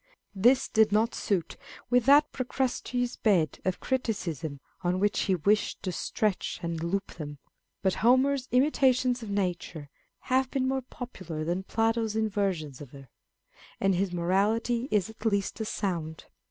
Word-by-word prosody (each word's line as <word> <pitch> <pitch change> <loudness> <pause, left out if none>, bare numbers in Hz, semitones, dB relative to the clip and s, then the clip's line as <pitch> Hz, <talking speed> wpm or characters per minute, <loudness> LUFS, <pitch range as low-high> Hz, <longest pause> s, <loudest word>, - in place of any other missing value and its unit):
This 240 +7 +4
did 220 -1 +3
not 220 +3 +2
suit 185 -6 -2 0.3
with 245 -2 +4
that 290 +2 +6
Pro 255 - -3
crustes' 250 -1 -2
bed 180 - +2
of 185 -1 -1
criticism 170 - -2 0.2
on 180 0 0
which 205 +1 +1
he 190 - +2
wished 205 +6 +1
to 185 - -2
stretch 210 +3 -1
and 170 -1 -2
lop 190 +4 -3
them; 145 -2 -6 0.5
but 190 -1 +2
Homer's 260 +2 +3
imitations 255 -2 +3
of 220 - -7
nature 175 -6 -3 0.3
have 260 0 +1
been 260 -1 0
more 265 0 0
popular 185 -11 -7
than 175 +4 -1
Plato's 225 +1 0
inversions 195 - -1
of 145 - -9
her; 135 -2 -12 0.7
and 195 0 +2
his 185 +1 0
morality 210 +8 +1
is 205 -4 +2
at 220 0 -13
least 200 -1 0
as 220 - -2
sound. 165 -8 -3
205 Hz, 155 wpm, -28 LUFS, 175-245 Hz, 0.7 s, that